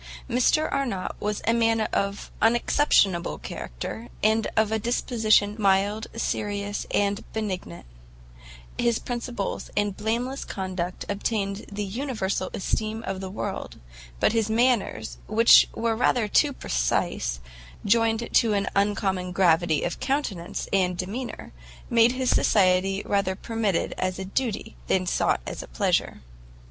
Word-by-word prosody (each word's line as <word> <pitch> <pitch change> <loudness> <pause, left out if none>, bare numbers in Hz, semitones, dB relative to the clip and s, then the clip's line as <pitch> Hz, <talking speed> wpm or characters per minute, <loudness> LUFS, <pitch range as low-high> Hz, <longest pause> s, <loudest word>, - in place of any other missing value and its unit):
Mr 255 +5 +2
Arnott 245 -10 -1
was 210 0 -2
a 230 - +3
young 235 - +1
man 225 -1 +3
of 200 -1 -2
unexceptionable 220 - +3
character, 105 - -6 0.2
and 220 +1 +3
of 220 0 +3
a 220 - +1
disposition 215 -3 +2
mild, 200 +2 +2
serious 205 -2 -2
and 200 0 0
benignant: 185 - -4 0.9
his 235 -2 +2
principles 240 -4 -4
and 205 -1 +1
blameless 235 +6 -2
conduct 185 -2 -4
obtained 200 0 -2
the 205 +1 -3
universal 200 -4 -2
esteem 220 +3 -2
of 195 0 -4
the 190 - -5
world, 195 - -5 0.4
but - - +3
his 225 -2 +1
manners, 235 0 +1
which 225 +2 +6
were 230 -1 0
rather 235 -1 +2
too 285 +7 +3
precise, - - -1 0.5
joined 225 +2 +2
to 225 -2 +4
an 200 -1 0
uncommon 195 -2 0
gravity 170 -3 +3
of - - -3
countenance 205 -10 -2
and 180 -2 +2
demeanour, 210 - -5 0.4
made 235 +1 +5
his 255 -1 0
society 195 0 +3
rather 195 -2 0
permitted 220 -3 -1
as 185 0 -1
a 190 - -5
duty, 220 +3 -3
than 185 -1 +1
sought 175 - +1
as - - -5
a - - -10
pleasure. - - 0
205 Hz, 135 wpm, -25 LUFS, 190-230 Hz, 0.9 s, which